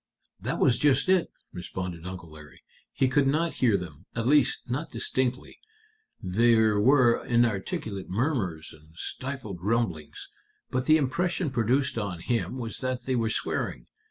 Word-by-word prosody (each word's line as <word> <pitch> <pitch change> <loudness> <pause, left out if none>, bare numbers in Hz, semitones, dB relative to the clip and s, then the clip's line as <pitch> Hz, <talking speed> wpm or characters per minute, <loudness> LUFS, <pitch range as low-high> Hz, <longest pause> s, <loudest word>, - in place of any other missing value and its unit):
"That - - -2
was 125 -3 +3
just 145 +3 +3
it," 185 -2 +3 0.2
responded 90 -1 -6
Uncle 90 -3 -8
Larry; 75 -1 -14 0.3
"he 135 - +1
could 135 +1 +2
not 160 +4 +1
hear 115 -6 +4
them 90 -1 -9
at 115 -1 -1
least, 145 +1 +3
not 130 +6 -3
distinctly. 130 -1 -2 0.6
There 110 +2 +3
were 120 +1 +4
inarticulate 110 -4 -1
murmurs 95 - -1
and 80 +1 -19
stifled 130 -1 -5
rumblings. 100 -7 -2 0.4
But 130 0 -1
the 155 0 +7
impression 170 +3 0
produced 125 +1 +1
on 100 -5 -4
him 120 +5 -1
was 115 -3 -5
that 130 -1 -2
they 130 - -1
were 115 -2 +1
swearing. - - -2
120 Hz, 145 wpm, -27 LUFS, 95-130 Hz, 0.6 s, the